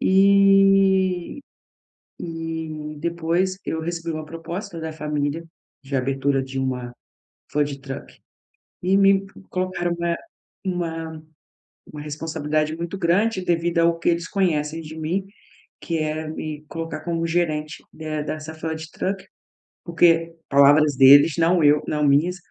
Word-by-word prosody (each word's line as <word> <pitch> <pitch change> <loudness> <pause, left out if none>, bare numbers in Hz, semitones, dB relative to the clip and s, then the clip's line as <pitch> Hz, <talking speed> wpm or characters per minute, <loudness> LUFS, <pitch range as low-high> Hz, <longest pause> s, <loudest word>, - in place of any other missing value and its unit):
E 195 0 +4 0.8
e 160 -2 -5
depois 170 +3 0
eu 160 - -2
recebi 170 0 -3
uma 155 -1 -5
proposta 170 +3 -6
da 160 0 -4
família, 150 0 -2 0.4
de 135 0 -4
abertura 135 +1 0
de 135 0 -5
uma 125 -2 -3 0.6
food 145 -1 -1
truck 135 0 -8 0.7
e 185 +2 +3
me 195 0 +4 0.2
colocaram 185 -1 -1
uma 170 0 0 0.5
uma 165 -3 -4 0.7
uma 150 - -9
responsabilidade 155 0 -2
muito 170 +3 -5
grande 190 +3 +1
devido 170 -1 +1
ao 165 0 +3
que - - +1
eles 170 0 0
conhecem 165 -4 0
de 155 0 -9
mim, 170 +5 -2 0.6
que 165 -2 -2
é 155 0 -2
me 155 -1 -6
colocar 165 -2 -5
como 165 0 -2
gerente 160 -2 -1
de 155 -1 -4
dessa 155 +1 -5
food 160 0 -5
truck, 195 +1 -3 0.6
porque, 165 -1 +3
palavras 145 +1 +5
deles, 140 +3 +8
não 170 +1 +3
eu 145 0 +5
não 150 0 -1
minhas, 155 +6 +3
165 Hz, 130 wpm, -23 LUFS, 150-175 Hz, 0.8 s, deles